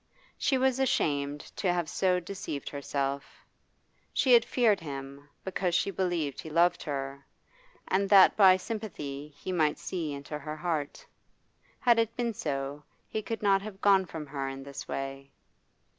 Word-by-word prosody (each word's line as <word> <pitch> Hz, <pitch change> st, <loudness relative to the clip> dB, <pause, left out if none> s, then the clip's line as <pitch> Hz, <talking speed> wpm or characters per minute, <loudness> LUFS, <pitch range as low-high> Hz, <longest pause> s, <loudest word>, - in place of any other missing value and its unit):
She 270 Hz, -, +1 dB
was 265 Hz, 0 st, +2 dB
ashamed 145 Hz, -, +1 dB, 0.2 s
to 185 Hz, -, +1 dB
have 175 Hz, -2 st, -1 dB
so 180 Hz, +3 st, +1 dB
deceived 180 Hz, -6 st, -5 dB
herself; 140 Hz, -1 st, -4 dB, 0.7 s
she 260 Hz, -3 st, +3 dB
had 235 Hz, -1 st, +8 dB
feared 230 Hz, -5 st, +2 dB
him, 140 Hz, -2 st, -8 dB
because 185 Hz, -2 st, -1 dB
she 190 Hz, +2 st, +1 dB
believed 170 Hz, -7 st, -1 dB
he 160 Hz, -, -8 dB
loved 170 Hz, +2 st, +3 dB
her, 140 Hz, -2 st, -4 dB, 0.6 s
and 195 Hz, +1 st, +1 dB
that 195 Hz, -2 st, +8 dB
by 190 Hz, -3 st, +7 dB
sympathy 175 Hz, -10 st, -5 dB
he 185 Hz, -, -5 dB
might 155 Hz, -4 st, +2 dB
see 165 Hz, -5 st, -3 dB
into 145 Hz, +1 st, -6 dB
her 150 Hz, +1 st, -6 dB
heart. 155 Hz, -4 st, -3 dB, 0.7 s
Had 235 Hz, -2 st, +4 dB
it 230 Hz, 0 st, 0 dB
been 235 Hz, -2 st, 0 dB
so, 140 Hz, -4 st, -3 dB, 0.3 s
he 220 Hz, -, -2 dB
could 220 Hz, +1 st, -5 dB
not 195 Hz, -1 st, +4 dB
have 200 Hz, -1 st, -8 dB
gone 195 Hz, -2 st, +4 dB
from 160 Hz, -2 st, -6 dB
her 135 Hz, -1 st, -4 dB
in 135 Hz, 0 st, -7 dB
this 140 Hz, 0 st, -8 dB
way. 135 Hz, 0 st, -5 dB
170 Hz, 160 wpm, -29 LUFS, 140-195 Hz, 0.7 s, had